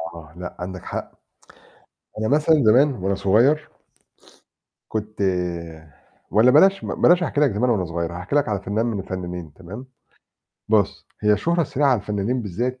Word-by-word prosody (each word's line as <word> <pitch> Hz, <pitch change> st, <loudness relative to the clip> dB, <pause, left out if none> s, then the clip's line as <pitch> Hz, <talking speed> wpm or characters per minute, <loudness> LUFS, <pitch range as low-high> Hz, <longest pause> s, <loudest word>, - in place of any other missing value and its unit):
آه، 80 Hz, -2 st, -12 dB
لأ، 90 Hz, 0 st, -7 dB
عندك 90 Hz, 0 st, -6 dB
حق. -, -, -5 dB, 1.1 s
أنا 110 Hz, -, -1 dB
مثلًا 150 Hz, +4 st, +3 dB
زمان 130 Hz, +7 st, +5 dB
وأنا 100 Hz, -4 st, -2 dB
صغير 120 Hz, +11 st, +2 dB, 1.2 s
كنت 110 Hz, -1 st, -5 dB, 1.1 s
والَّا 115 Hz, +4 st, +5 dB
بلاش 195 Hz, +7 st, +5 dB
ب -, -, -6 dB
بلاش 175 Hz, +1 st, +5 dB
أحكي 150 Hz, -3 st, -1 dB
لك 145 Hz, -4 st, +4 dB
زمان 115 Hz, +5 st, 0 dB
وأنا 100 Hz, -6 st, +1 dB
صغير 85 Hz, 0 st, -4 dB
هاحكي 90 Hz, +9 st, -4 dB
لك 145 Hz, -5 st, +2 dB
على 100 Hz, -2 st, -2 dB
فنان 105 Hz, +4 st, -1 dB
من 115 Hz, -4 st, -2 dB
الفنانين 90 Hz, -4 st, -6 dB
تمام؟ 95 Hz, -, -10 dB, 0.8 s
بُص، 105 Hz, -2 st, +1 dB
هي 105 Hz, 0 st, +3 dB
الشهرة 170 Hz, -, +1 dB
السريعة 145 Hz, -1 st, 0 dB
على 125 Hz, -5 st, +3 dB
الفنانين 105 Hz, +5 st, -2 dB
بالذات 120 Hz, +6 st, -3 dB
110 Hz, 155 wpm, -22 LUFS, 95-130 Hz, 1.2 s, زمان